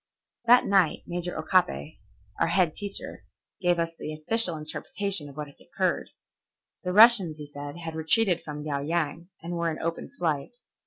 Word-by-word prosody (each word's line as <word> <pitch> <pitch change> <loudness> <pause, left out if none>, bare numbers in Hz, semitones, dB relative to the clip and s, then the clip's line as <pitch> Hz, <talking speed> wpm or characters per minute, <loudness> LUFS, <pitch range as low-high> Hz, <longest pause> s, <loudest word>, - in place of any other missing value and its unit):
That 245 +1 +6
night 195 -5 +2
Major 175 0 -4
Okabe, 155 - 0 0.4
our 165 - +3
head 170 -2 +2
teacher, 200 -1 -6 0.4
gave 175 -1 +2
us 165 0 -1
the 155 - -6
official 175 +2 +3
interpretation 155 +2 -3
of 140 - -14
what 150 - -4
had 140 - -17
occurred. - - -2 0.7
The 180 - -2
Russians, 205 -6 +7
he 150 - -8
said, 145 +1 -8
had 165 -1 -6
retreated 170 +3 +2
from 150 -1 -7
Liao 145 -2 -2
Yang 165 +2 -2
and 170 +1 -5
were 170 -1 0
in 155 - -4
open 165 0 -4
flight. 160 - -2
165 Hz, 165 wpm, -27 LUFS, 155-185 Hz, 0.7 s, Russians